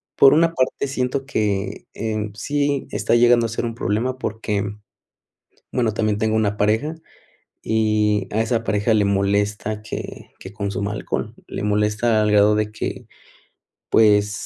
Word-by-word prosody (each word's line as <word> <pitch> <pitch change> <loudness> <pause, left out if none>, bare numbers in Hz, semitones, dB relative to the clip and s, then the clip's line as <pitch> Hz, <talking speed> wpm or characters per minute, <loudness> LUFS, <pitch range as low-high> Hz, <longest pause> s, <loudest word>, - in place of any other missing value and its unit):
por 135 0 +7
una 165 +2 +3
parte 130 0 0
siento 130 0 -2
que 105 -6 -2
en 110 -1 -3
sí 145 +4 -1
está - - +1
llegando 120 0 +5
a - - -2
ser 115 +2 -3
un 115 -1 -4
problema, 120 +3 -1
porque, 105 -4 -2 1.1
bueno, 115 -4 0
también 110 -1 0
tengo 110 0 0
una 105 -2 +1
pareja 110 +10 +1 0.7
y 105 -2 +1
a 110 - 0
esa 115 0 0
pareja 105 +2 +1
le 105 -2 +3
molesta 100 +2 0
que 105 - -7
que 95 - -10
consuma 100 0 -3
alcohol. 105 - -4
Le - - -5
molesta 105 +2 +1
al 105 - +1
grado 105 0 +5
de 105 0 -1
que, 110 - -5 0.8
pues, 105 -2 +4
110 Hz, 150 wpm, -21 LUFS, 105-120 Hz, 1.1 s, por